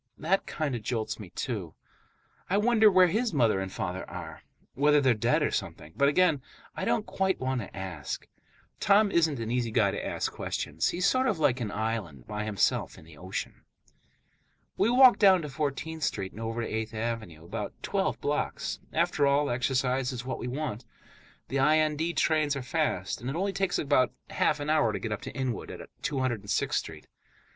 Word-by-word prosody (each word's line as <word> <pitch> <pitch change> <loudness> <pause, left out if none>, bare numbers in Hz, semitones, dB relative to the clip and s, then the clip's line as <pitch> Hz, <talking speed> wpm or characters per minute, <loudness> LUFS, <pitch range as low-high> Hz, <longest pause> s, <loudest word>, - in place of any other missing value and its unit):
That 185 +5 0
kind 155 -4 -2
of 120 - -4
jolts 110 0 -3
me, 100 -4 -9
too. 95 -6 -4 0.7
I 195 - +2
wonder 220 0 +5
where 185 -2 +6
his 215 +2 0
mother 115 -7 +3
and 95 0 -4
father 90 +1 -3
are, - - -8 0.3
whether 150 +2 +4
they're 130 -3 +4
dead 105 - +1
or - - +1
something; 80 - -4
but 140 0 +4
again, 155 -2 +3 0.3
I - - -3
don't 215 - +1
quite 190 -1 0
want 130 -1 -1
to 100 - -9
ask. 90 -7 -5 0.5
Tom 205 0 +4
isn't 160 -5 +2
an 115 0 -3
easy 120 -1 0
guy 110 -3 +3
to - - -4
ask - - -2
questions. 75 +3 -2
He's 180 +2 -1
sort 260 +4 +3
of 210 - +1
like 140 -5 +2
an 110 - -2
island, 100 - -3
by 105 0 -4
himself 105 -3 0
in - - -14
the 80 -1 -14
ocean. 90 +5 -6 1.1
We 205 - +2
walk 255 +1 +7
down 190 -4 +6
to 150 - -5
Fourteenth 155 +2 -3
Street 95 -9 -2
and 110 - -9
over 115 +1 -2
to - - -3
Eighth 110 0 -3
Avenue, 110 -8 -4
about - - -5
twelve - - -1
blocks; - - -2
after 145 - +2
all, 140 0 +2
exercise 130 +1 0
is 125 -1 -6
what 130 - -4
we - - -4
want. 130 -3 -3 0.7
The 135 - -1
IND 155 +3 +2
trains 155 -3 +2
are 140 - -4
fast, 125 - -1
and 125 - -4
it 135 - -3
only 195 +3 -1
takes 195 -1 0
about 140 -4 +2 0.2
half - - +1
an 145 - -4
hour 150 -8 +3
to - - -2
get 110 - -4
up 105 - -3
to - - -7
Inwood, 130 -3 -3
at - - -8
206th 130 -8 -1
Street. - - -3
130 Hz, 190 wpm, -28 LUFS, 110-160 Hz, 1.1 s, walk